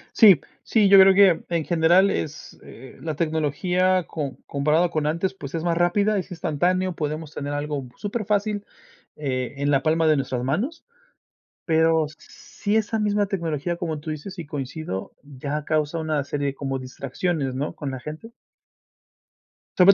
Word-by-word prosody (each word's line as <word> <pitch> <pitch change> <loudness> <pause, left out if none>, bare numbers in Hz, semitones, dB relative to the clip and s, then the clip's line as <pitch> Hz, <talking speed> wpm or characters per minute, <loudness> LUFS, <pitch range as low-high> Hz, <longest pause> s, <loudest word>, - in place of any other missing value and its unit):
Sí, 195 -9 +8 0.2
sí, 210 -4 +3
yo 195 -1 +9
creo 190 0 +8
que, 190 -4 +5
en 170 -3 -1
general 175 +3 +4
es, 155 0 -5
eh, 130 +2 -13
la 155 -2 -3
tecnología 175 +4 +1
com 145 -4 -4
comparado 155 +5 +1
con 155 -1 0
antes, 170 +5 -1
pues, 145 -4 -8
es 160 - -2
más 170 -1 +1
rápida, 200 +4 +2
es 185 - -6
instantáneo, 180 +3 0
podemos 155 0 -4
tener 145 0 -4
algo 145 -2 -3
superfácil 205 -1 -1 0.5
eh, 130 -2 -3
en 145 +1 0
la 135 - +3
palma 160 +1 +2
de 155 - +5
nuestras 130 -3 -2
manos. 200 - -2 0.8
Pero 160 -1 +3
sí 205 +1 -4
esa 220 0 0
misma 205 -1 +1
tecnología, 170 -3 -2
como 160 -3 -3
tú 155 +2 -6
dices, 175 +5 -7
y 165 - -6
coincido, 140 -7 -5
ya 145 +2 -5
causa 155 +1 0
una 155 -2 -1
serie 140 0 -2
como 135 -1 -3
distracciones, 135 +2 -3
¿no?, 145 +3 -3
con 140 -2 -5
la 130 - -5
gente. 155 - -8 1.5
Sobre 190 +2 +8
160 Hz, 160 wpm, -24 LUFS, 145-185 Hz, 1.5 s, yo